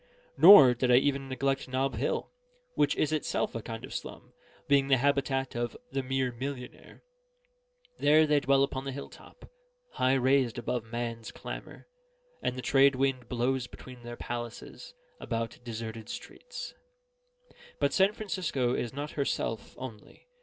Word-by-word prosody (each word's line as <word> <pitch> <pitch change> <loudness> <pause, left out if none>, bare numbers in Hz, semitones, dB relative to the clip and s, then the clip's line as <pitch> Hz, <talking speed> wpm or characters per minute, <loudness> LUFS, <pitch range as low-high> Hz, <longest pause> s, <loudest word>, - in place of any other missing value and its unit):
Nor 160 -9 +10
did 125 +1 -1
I 125 - +7
even 135 +1 +2
neglect 135 +1 -1
Nob 130 +1 -1
Hill, - - -2 0.4
which - - +2
is 155 - 0
itself 155 -1 -1
a 115 - -4
kind 115 +1 -7
of - - -10
slum, - - -7 0.3
being 140 -1 +4
the 135 -1 +4
habitat 135 0 0
of 120 0 -3
the 135 - -1
mere 130 -1 -1
millionnaire. 125 +1 -8 1.0
There 155 +2 +5
they 150 -1 +3
dwell 135 -1 +3
upon 135 -1 -2
the 135 - -3
hill 140 +2 -7
top, - - -15 0.4
high 130 +1 +2
raised 130 -2 +2
above 120 -1 -2
man's 115 0 -5
clamour, - - -9 0.5
and 125 - -1
the 130 - -5
trade 135 0 +5
wind 130 -2 -1
blows 125 +1 0
between 125 0 -12
their 120 0 -8
palaces 120 - -7 0.2
about 115 -1 -4
deserted 115 -1 -6
streets. - - -8 1.0
But - - +1
San 195 +1 +4
Francisco 175 - -1
is 120 -2 -2
not 145 +2 -5
herself 115 -6 -2
only. 115 -5 -10
130 Hz, 150 wpm, -29 LUFS, 120-140 Hz, 1.0 s, Nor